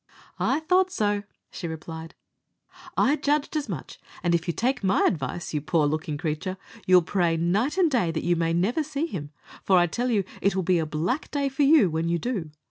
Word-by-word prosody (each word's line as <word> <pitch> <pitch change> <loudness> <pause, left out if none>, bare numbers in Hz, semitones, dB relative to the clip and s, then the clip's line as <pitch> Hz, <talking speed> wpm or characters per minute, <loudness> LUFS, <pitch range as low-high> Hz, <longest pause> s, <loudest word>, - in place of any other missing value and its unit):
"I 315 - +1
thought 365 +3 +3
so," 205 - 0 0.3
she 175 - -5
replied; 160 +1 -7 0.8
"I 280 +3 +4
judged 295 +1 0
as 295 -6 -2
much; 165 -9 -6 0.2
and 175 -1 +2
if 170 +1 0
you - - +2
take 255 0 0
my 190 0 +3
advice, 165 +1 -2
you 150 - 0
poor 155 +1 +1
looking 150 0 -2
creature, 165 +4 -3 0.3
you'll 180 -1 +6
pray 170 -2 +1
night 205 - +1
and 350 -5 +3
day 230 -10 +2
that 165 -1 -2
you 175 0 +3
may 165 0 0
never 190 - +1
see 300 0 -2
him, 155 - -6 0.3
for 190 - +4
I 175 - +5
tell 240 +9 -2
you 210 -5 +2 0.2
it 200 0 +2
will 190 - 0
be 180 0 +2
a 160 - -1
black 165 - -2
day 280 -1 0
for 270 +2 -3
you 285 -6 +6
when 160 +1 -1
you 170 - +1
do. 195 -6 -3
185 Hz, 215 wpm, -26 LUFS, 165-260 Hz, 0.8 s, you'll